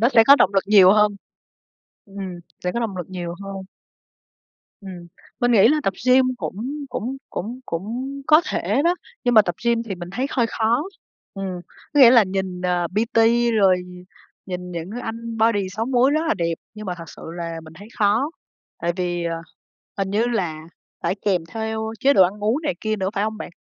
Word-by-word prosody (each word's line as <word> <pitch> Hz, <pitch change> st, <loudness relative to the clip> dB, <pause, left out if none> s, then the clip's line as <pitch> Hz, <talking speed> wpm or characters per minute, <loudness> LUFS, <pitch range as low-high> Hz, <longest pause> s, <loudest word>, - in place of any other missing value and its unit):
nó 235 Hz, -, +5 dB
sẽ 225 Hz, -4 st, +5 dB
có 280 Hz, -, +9 dB
động 200 Hz, -7 st, +3 dB
lực 195 Hz, -, +3 dB
nhiều 195 Hz, -2 st, +7 dB
hơn. 210 Hz, -1 st, +3 dB, 0.9 s
Ừm, 195 Hz, -3 st, -7 dB, 0.2 s
sẽ 180 Hz, -, 0 dB
có 235 Hz, -, -2 dB
động 215 Hz, -5 st, -3 dB
lực 180 Hz, 0 st, -6 dB
nhiều 175 Hz, -2 st, -5 dB
hơn. 195 Hz, 0 st, -6 dB, 1.2 s
Ừm, 180 Hz, -3 st, -9 dB, 0.3 s
mình 245 Hz, 0 st, +3 dB
nghĩ 225 Hz, 0 st, +6 dB
là 305 Hz, +1 st, +2 dB
tập 195 Hz, -, 0 dB
gym 255 Hz, +1 st, +6 dB
cũng 190 Hz, -, -5 dB, 0.3 s
cũng 250 Hz, +2 st, -4 dB
cũng 235 Hz, +7 st, -5 dB
cũng 225 Hz, +10 st, -4 dB, 0.2 s
có 305 Hz, +1 st, +7 dB
thể 280 Hz, -, 0 dB
đó, 345 Hz, +1 st, +3 dB, 0.3 s
nhưng 245 Hz, -, +2 dB
mà 215 Hz, -, +8 dB
tập 175 Hz, -3 st, -3 dB
gym 235 Hz, -1 st, +2 dB
thì 220 Hz, -4 st, -5 dB
mình 175 Hz, -1 st, -8 dB
thấy 255 Hz, +5 st, -1 dB
hơi 240 Hz, -3 st, +1 dB
khó. 230 Hz, +3 st, +1 dB, 0.5 s
Ừm, 190 Hz, -2 st, -5 dB, 0.3 s
có 290 Hz, -, +5 dB
nghĩa 245 Hz, -3 st, +10 dB
là 240 Hz, -2 st, +7 dB
nhìn, 185 Hz, -1 st, -3 dB
ờ, 180 Hz, -1 st, +1 dB
PT 225 Hz, +2 st, 0 dB, 0.4 s
rồi 195 Hz, -4 st, +5 dB, 0.7 s
nhìn 180 Hz, -1 st, -5 dB
những 170 Hz, +1 st, -5 dB
anh 230 Hz, 0 st, -5 dB
body 210 Hz, -4 st, +2 dB
6 220 Hz, +4 st, -3 dB
múi 260 Hz, +1 st, +3 dB
rất 305 Hz, +2 st, +2 dB
là -, -, +2 dB
đẹp, 170 Hz, -1 st, -1 dB, 0.2 s
nhưng 215 Hz, -1 st, -8 dB
mà 180 Hz, -, -2 dB
thật 170 Hz, -, -7 dB
sự -, -, -12 dB
là 165 Hz, -1 st, -5 dB
mình 160 Hz, -, -13 dB
thấy 205 Hz, +2 st, -12 dB
khó. 220 Hz, +8 st, +2 dB, 0.5 s
Tại 170 Hz, +1 st, -1 dB
vì, 175 Hz, -2 st, -2 dB
ờ, 165 Hz, 0 st, -2 dB, 0.6 s
hình 195 Hz, -1 st, -1 dB
như 215 Hz, +4 st, +1 dB
là 175 Hz, -10 st, -2 dB, 0.4 s
phải -, -, 0 dB
kèm 185 Hz, -4 st, +2 dB
theo 220 Hz, +2 st, -3 dB
chế 280 Hz, +1 st, +5 dB
độ 190 Hz, -, +7 dB
ăn 205 Hz, +3 st, 0 dB
uống 245 Hz, +9 st, +1 dB
này 285 Hz, -3 st, -1 dB
kia 215 Hz, 0 st, -1 dB
nữa 190 Hz, -2 st, -1 dB
phải 200 Hz, +1 st, 0 dB
hông 220 Hz, 0 st, -3 dB
bạn? -, -, -7 dB
205 Hz, 205 wpm, -22 LUFS, 185-235 Hz, 1.2 s, nghĩa